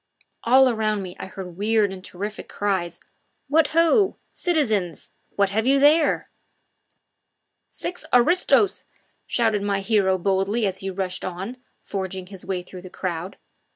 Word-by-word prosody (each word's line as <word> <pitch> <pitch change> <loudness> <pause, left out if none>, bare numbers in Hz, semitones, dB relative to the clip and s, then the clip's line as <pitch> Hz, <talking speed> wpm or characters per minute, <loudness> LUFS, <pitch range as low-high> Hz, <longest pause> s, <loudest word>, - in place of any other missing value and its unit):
All 260 +3 +6
around 215 -4 0
me 180 -1 -8
I - - -6
heard 185 -2 -8
weird 210 -1 +2
and 185 -1 -10
terrific 205 +3 -6
cries: 185 -4 -2 0.5
"What 305 +2 +4
ho! 335 +5 +3 0.2
citizens 220 - -1 0.2
what 200 -1 +2
have 220 +4 0
you 275 +1 +4
there?" 300 +2 +3 1.4
"Six 360 -2 -6
aristos!" 355 - +3 0.4
shouted 220 -4 +1
my 200 -1 0
hero 195 -2 +2
boldly 195 +4 0
as 190 -1 -2
he 195 - -4
rushed 185 -1 -3
on, 190 +7 -5 0.3
forging 190 -1 -4
his 190 0 -9
way 185 -2 -3
through 180 0 -11
the 185 - -10
crowd. 180 0 -4
200 Hz, 140 wpm, -23 LUFS, 190-245 Hz, 1.4 s, All